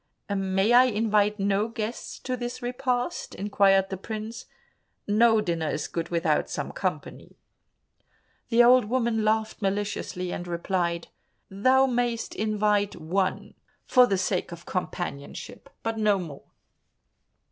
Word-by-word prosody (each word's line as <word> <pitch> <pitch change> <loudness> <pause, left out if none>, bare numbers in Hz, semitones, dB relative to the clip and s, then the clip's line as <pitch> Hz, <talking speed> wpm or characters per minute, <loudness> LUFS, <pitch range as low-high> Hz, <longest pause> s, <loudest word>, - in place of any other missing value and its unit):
"May 195 +3 +1
I 250 +1 +8
invite 210 -3 +2
no 200 +2 +1
guests 230 0 -5
to 255 - -2
this 245 0 -5
repast?" 245 0 -2
inquired 195 -1 +3
the 190 - -3
prince, 220 +3 -6 0.6
"no 220 +1 +4
dinner 165 -5 -1
is 150 - -2
good 165 0 -4
without 170 -1 +1
some - - -4
company." - - -4 1.1
The 235 0 +6
old 250 -1 +6
woman 230 -1 0
laughed 220 +1 0
maliciously, 195 -2 -2
and 175 - -5
replied, 170 -1 -2 0.4
"Thou 260 +7 +4
mayst 240 -2 -1
invite 210 -1 +1
one 185 +4 -2 0.3
for 250 -1 +6
the 195 - +1
sake 185 -1 -1
of 170 0 -10
companionship, 175 -6 -5
but 225 -1 -2
no 210 -2 +3
more." 160 -7 -8
210 Hz, 125 wpm, -26 LUFS, 190-235 Hz, 1.1 s, I